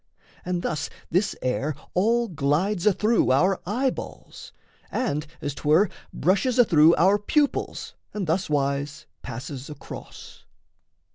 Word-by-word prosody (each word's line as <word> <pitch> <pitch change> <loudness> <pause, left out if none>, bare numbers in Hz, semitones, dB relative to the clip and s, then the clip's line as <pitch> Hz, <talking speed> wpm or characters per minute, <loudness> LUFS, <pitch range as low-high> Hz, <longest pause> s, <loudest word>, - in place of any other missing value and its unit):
And 180 -1 -2
thus 150 -3 -2 0.2
this 185 +5 +1
air 130 +4 -1 0.2
All 230 +5 +2
glides 170 +4 0
athrough 215 +3 +3
our 185 +8 +3
eyeballs, 250 +6 -4 0.4
and, 160 - -1
as 145 - -3
'twere, 160 +7 +3 0.2
Brushes 215 +7 +1
athrough 165 -9 +6
our 190 +6 +4
pupils 285 +7 -1 0.2
and 210 -3 -3
thuswise 145 -4 -1 0.2
Passes 130 +3 -7
across. 150 -2 -10
175 Hz, 110 wpm, -25 LUFS, 145-210 Hz, 0.4 s, athrough